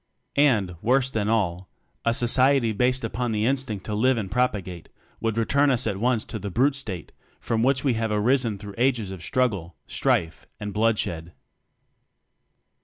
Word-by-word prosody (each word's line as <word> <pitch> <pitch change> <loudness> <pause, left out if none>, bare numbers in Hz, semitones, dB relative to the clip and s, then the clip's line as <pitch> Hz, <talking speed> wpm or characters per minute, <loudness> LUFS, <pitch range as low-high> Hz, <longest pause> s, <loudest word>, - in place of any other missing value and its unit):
And 105 -11 +2
worse 130 +3 +2
than 105 -3 -1
all 95 -5 0 0.3
a 115 0 +2
society 125 0 +3
based 125 +4 +1
upon 120 +1 -2
the 105 0 0
In 135 +3 +3
stinct 110 -8 -3
to 105 - -4
Live 125 +4 +2
and 100 -4 -4
Propagate, 95 -9 -2 0.3
would 115 -1 -2
return 140 +5 +2
us 130 -2 +2
at 100 -3 -1
once 120 +1 +1
to 110 - -6
the 100 +1 -5
brute 130 +9 +2
state 105 - -6 0.3
from 115 -1 -1
which 135 +2 +2
we 135 -4 +2
have 115 0 -1
arisen 115 +1 +1
through 100 0 -9
ages 120 -6 +1
of 95 -3 -8
struggle, 100 - -1
strife, 80 +1 -1
and 105 -1 -5
bloodshed. 100 -7 0
115 Hz, 170 wpm, -25 LUFS, 100-125 Hz, 0.3 s, society